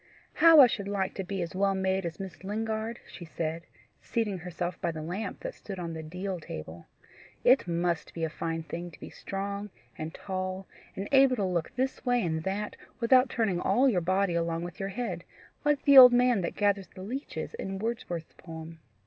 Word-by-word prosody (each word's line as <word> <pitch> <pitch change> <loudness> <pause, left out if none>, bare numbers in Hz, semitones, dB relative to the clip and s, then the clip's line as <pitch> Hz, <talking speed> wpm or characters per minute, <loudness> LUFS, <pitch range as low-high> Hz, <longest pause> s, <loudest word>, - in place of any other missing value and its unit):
"How 330 -2 +7
I - - +10
should 205 -4 -2
like 195 -2 -1
to 195 - -4
be 190 0 -3
as 170 - -6
well 195 +1 +1
made 190 -1 0
as 165 - -8
Miss 190 -2 -8
Lingard!" 220 +3 -3
she 175 - -10
said, 165 0 -4 0.3
seating 210 -5 -2
herself 175 0 -5
by 170 - 0
the 155 -1 -6
lamp 180 +7 -4
that - - -5
stood 195 -2 -8
on 170 -2 -4
the 160 - -5
deal 180 +4 -4
table. 80 - -8 0.6
"It 255 -5 +5
MUST 170 -1 -1
be 165 - -3
a 160 - 0
fine 165 0 -3
thing 170 +2 -6
to 165 - -16
be - - -9
strong 200 +1 -5 0.3
and 155 +1 -5
tall, 185 +1 -4 0.3
and 195 +1 -4
able 270 -2 +6
to 205 -5 0
look 175 -3 -1
this 260 +2 -2
way 245 -4 +2
and 160 -1 -1
that 200 +2 -2 0.2
without 255 +1 +5
turning 215 -8 0
all 265 +3 +3
your 195 -9 +2
body 185 +1 +1
along 170 0 -1
with 175 -1 -8
your 195 0 -2
head, 190 -5 -4 0.4
like 295 -1 +2
the 280 -1 +9
old 250 -1 +11
man 245 -4 +4
that 170 - -3
gathers 200 -2 +1
the 185 - -11
leeches 260 - -5
in 195 - -5
Wordsworth's 190 -7 -4
poem. 160 -1 -10
190 Hz, 200 wpm, -29 LUFS, 170-220 Hz, 0.6 s, old